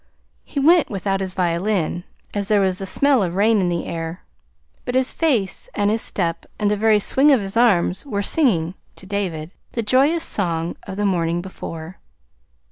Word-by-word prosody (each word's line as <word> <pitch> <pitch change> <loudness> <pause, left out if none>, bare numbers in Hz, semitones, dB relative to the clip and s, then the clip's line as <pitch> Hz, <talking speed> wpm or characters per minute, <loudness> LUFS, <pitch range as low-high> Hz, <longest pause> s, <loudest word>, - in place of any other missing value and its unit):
He 285 - -4
went 325 +3 +5
without 195 -1 -2
his 190 -1 -5
violin, 175 0 0 0.3
as 200 -1 -2
there 210 0 +3
was 190 -2 +1
the 195 - -4
smell 280 +4 +3
of 175 -2 -2
rain 210 +1 +3
in 180 - +1
the 170 -1 -2
air; 165 +1 -5 0.6
but 245 - -4
his 260 0 +2
face 230 - 0
and 205 0 +2
his 225 +1 +1
step 170 -4 -2
and 205 -1 +1
the - - +2
very 215 +1 +3
swing 270 +7 +3
of 270 -4 +5
his 195 0 -6
arms 200 -6 +3
were 205 -6 -2
singing 185 - +1 0.2
(to - - -10
David) 180 -5 -3 0.2
the 230 - -1
joyous 280 +9 +3
song 170 - -1
of 190 - -6
the 205 - 0
morning 170 -3 0
before. 175 -2 -8
200 Hz, 185 wpm, -21 LUFS, 175-225 Hz, 0.6 s, went